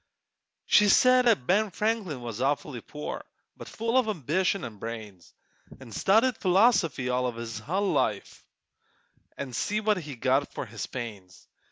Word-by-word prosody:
She 210 -1 +5
said 255 +4 +5
'at 210 - +3
Ben 210 +6 +2
Franklin 195 - -2
was 115 -1 -5
awfully 140 -2 -1
poor, 150 +5 -6 0.3
But - - -10
full 230 +3 +1
of 250 - 0
ambition 185 - 0
an' 110 -3 -9
brains; 105 -6 -8 0.5
An' 130 -3 -12
studied 220 - +3
philosophy 180 - +3
all 125 0 0
his 115 -1 -6
hull 190 - -1
life, - - -1 0.9
An' 135 -3 -6
see 210 - -1
what 215 -1 +1
he 150 -6 -6
got 130 +4 +1
for - - -4
his 115 -1 -6
pains! 105 -7 -8
150 Hz, 150 wpm, -27 LUFS, -, 0.9 s, She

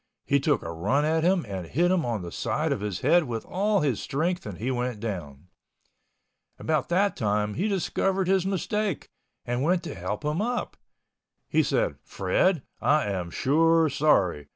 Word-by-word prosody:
He 140 - +3
took 145 +1 +1
a 80 - -5
run 115 - +1
at 160 +1 +1
him 180 -3 +2
and 95 -4 -5
hit 175 - +2
him 175 -8 +1
on 110 -5 -2
the 85 - -7
side - - -1
of - - -1
his 105 -4 -3
head 175 -1 +4
with 115 -3 -4
all 205 +2 +1
his 135 -7 0
strength 170 +1 -2
and 100 -4 -6
he 125 +5 -2
went 125 -3 -2
down. 90 -8 -6 1.1
About 155 -4 -1
that 195 +3 +2
time 105 -1 0
he 190 - -1
discovered 195 -1 0
his 190 -1 +3
mistake 195 0 -2 0.4
and 120 +1 -1
went 175 +4 +1
to 170 - -5
help 100 - -4
him 150 +5 0
up. 245 +2 -2 0.7
He - - +3
said, - - 0
"Fred, 185 -7 +1 0.2
I 145 -8 +2
am 90 -3 -3
sure 160 - +3
sorry. 100 - +2
145 Hz, 175 wpm, -26 LUFS, -, 1.1 s, head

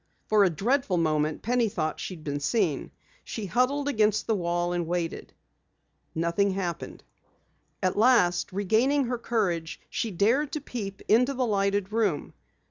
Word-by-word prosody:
For 215 -1 +4
a 190 - +4
dreadful 205 - 0
moment 155 -2 0
Penny 240 -1 +1
thought 155 -5 -2
that - - -8
she 185 - -5
had 160 - -14
been 145 -1 -3
seen. 165 - 0 0.3
She 220 - -5
huddled 255 +8 +1
against 215 -5 +2
the 225 - +1
wall 175 -2 -1
and 175 -2 -2
waited. 170 -1 -3 0.8
Nothing 170 +5 +1
happened. 185 -3 -4 0.8
At 185 - +1
last, 205 -6 +3
regaining 225 +9 +2
her 245 0 -2
courage, 175 -10 -1
she 230 - -1
dared 230 - +1
to 305 - -1
peep 200 -8 -6
into 250 +5 +3
the 255 0 +1
lighted 200 -1 0
room. 210 -9 0
200 Hz, 155 wpm, -27 LUFS, 175-235 Hz, 0.8 s, For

